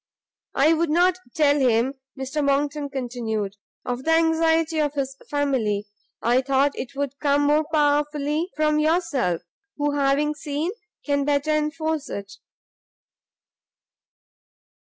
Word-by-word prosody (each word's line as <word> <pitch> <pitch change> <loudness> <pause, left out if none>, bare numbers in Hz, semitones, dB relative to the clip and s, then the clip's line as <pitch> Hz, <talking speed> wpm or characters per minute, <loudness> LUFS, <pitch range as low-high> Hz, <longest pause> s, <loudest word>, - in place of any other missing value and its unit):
"I 305 +4 +5
would 330 0 +1
not 355 +3 +3 0.2
tell 290 -2 +4
him," 250 0 +2 0.3
Mr 270 +3 -2
Monckton 285 +1 0
continued, 235 -6 -3 0.3
"of 250 +1 -3
the 325 - +2
anxiety 325 0 +2
of 295 -1 0
his 270 -1 -2
family; 255 -8 0 0.4
I 245 +3 +3
thought 275 +1 +2
it 270 +2 -7
would 280 0 -3
come 290 -1 +2
more 300 +1 +3
powerfully 295 +2 +1
from 305 0 +2
yourself, 305 - +1 0.3
who, 290 0 +1
having 285 +1 +1
seen, 300 +3 -3 0.3
can 285 -1 +1
better 285 +1 +1
enforce 305 0 -1
it." 200 0 -6
290 Hz, 120 wpm, -24 LUFS, 270-310 Hz, 0.4 s, I